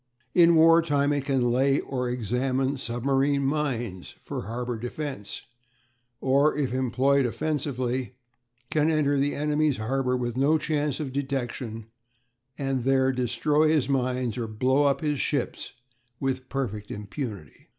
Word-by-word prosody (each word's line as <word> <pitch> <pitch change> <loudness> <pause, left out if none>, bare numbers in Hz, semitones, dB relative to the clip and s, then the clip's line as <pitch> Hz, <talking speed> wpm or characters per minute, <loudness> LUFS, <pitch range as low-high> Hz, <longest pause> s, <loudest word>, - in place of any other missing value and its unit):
In 170 -1 +6
war 165 +1 +7
time 145 -3 +1
it 140 -1 -2
can 130 -4 +1
lay 135 +3 +3
or 125 -2 -3
examine 130 +3 -1
submarine 135 +3 +1
mines 125 -10 -2
for - - -6
harbour 120 +1 -3
defence, 125 -3 -5 0.8
or, 140 +3 +3
if 135 -4 -1
employed 130 +1 +2
offensively, 130 -3 -2 0.6
can 155 0 +2
enter 145 -3 +2
the 140 +1 0
enemy's 150 -1 +1
harbour 125 +3 0
with 120 -1 -3
no 140 +5 +3
chance 150 -2 -1
of 140 -4 -4
detection, 125 -5 -3 0.7
and 135 -3 -1
there 135 0 +3
destroy 130 +5 +1
his 155 -5 +2
mines 125 -3 -1
or 115 - -2
blow 130 +6 +2
up 140 -1 +2
his 150 -3 -1
ships 140 -4 -2 0.5
with 130 -1 -2
perfect 110 -7 -3
impunity. 105 - -7
135 Hz, 135 wpm, -26 LUFS, 125-145 Hz, 0.8 s, war